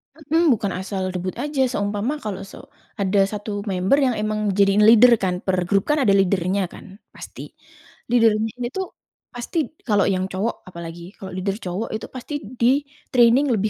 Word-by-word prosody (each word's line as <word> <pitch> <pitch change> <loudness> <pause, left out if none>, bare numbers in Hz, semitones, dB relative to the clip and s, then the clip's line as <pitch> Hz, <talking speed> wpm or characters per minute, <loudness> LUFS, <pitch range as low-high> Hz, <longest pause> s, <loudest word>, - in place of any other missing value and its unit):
Mhm, 320 +2 +1
bukan 200 -3 -2
asal 190 -1 -3
debut 185 0 -4
aja, 290 -2 -1
seumpama 205 +3 -1
kalau 195 -3 -4
se - - -11 0.4
ada 195 +1 +2
1 205 0 -5
member 190 +7 +2
yang 260 -4 +2
emang 215 0 -1
di 200 +1 +3
jadiin 200 +1 +3
leader 235 +2 +8
kan, 180 -1 -1
per 190 -1 +1
grup 195 +1 +2
kan 300 - +2
ada 200 -5 +4
leader-nya 195 0 +1
kan - - -11 0.3
pasti. - - -10 0.7
Leader-nya 225 -2 +3 0.2
itu 385 - -4 0.5
pasti 245 +8 -6 0.3
kalau 205 -3 +3
yang 185 -1 0
cowok 200 +5 -3
apalagi 170 +1 -9
kalau 190 - -8
leader 190 +1 -2
cowok 185 +5 -4
itu 220 - -4
pasti 255 +4 -7 0.3
di 255 +5 +4 0.3
training 245 +3 +5
lebih 215 0 0
205 Hz, 170 wpm, -22 LUFS, 190-235 Hz, 0.7 s, leader